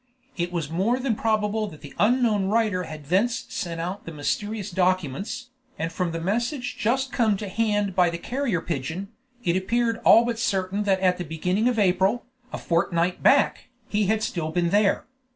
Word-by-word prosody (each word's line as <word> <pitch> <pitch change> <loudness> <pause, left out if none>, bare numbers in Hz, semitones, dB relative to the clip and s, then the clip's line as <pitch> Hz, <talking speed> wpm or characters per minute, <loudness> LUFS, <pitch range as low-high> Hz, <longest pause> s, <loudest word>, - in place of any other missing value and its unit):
It 175 -1 -2
was 170 -4 -2
more 195 +9 +1
than 260 -2 0
probable 215 0 0
that 155 -7 -11
the 145 - -10
unknown 220 -3 +3
writer 205 -3 +1
had 155 -2 -9
thence 200 - +1
sent 170 -1 -4
out 180 +5 -4
the - - -4
mysterious 205 +7 -3
documents, 185 - -1 0.3
and 165 +1 -2
from 180 -1 -1
the 165 - -3
message 240 - -2
just 260 +4 0
come 220 -4 +2
to 205 - -5
hand 205 -1 0
by 180 -2 +4
the 170 - -4
carrier 235 -2 -2
pigeon, 165 +5 -4 0.3
it 175 -2 +1
appeared 230 +4 +1
all 230 - +7
but 235 -1 -2
certain 195 -1 0
that 190 -2 +2
at 180 -1 +2
the - - -2
beginning 180 +7 0
of 245 - -1
April, 195 +3 +2 0.3
a - - -4
fortnight 170 +1 0
back, 275 -2 +3 0.2
he 210 -1 +1
had 220 +1 +1
still 165 -7 -2
been 170 +1 0
there. 205 -1 +2
195 Hz, 185 wpm, -25 LUFS, 175-225 Hz, 0.3 s, all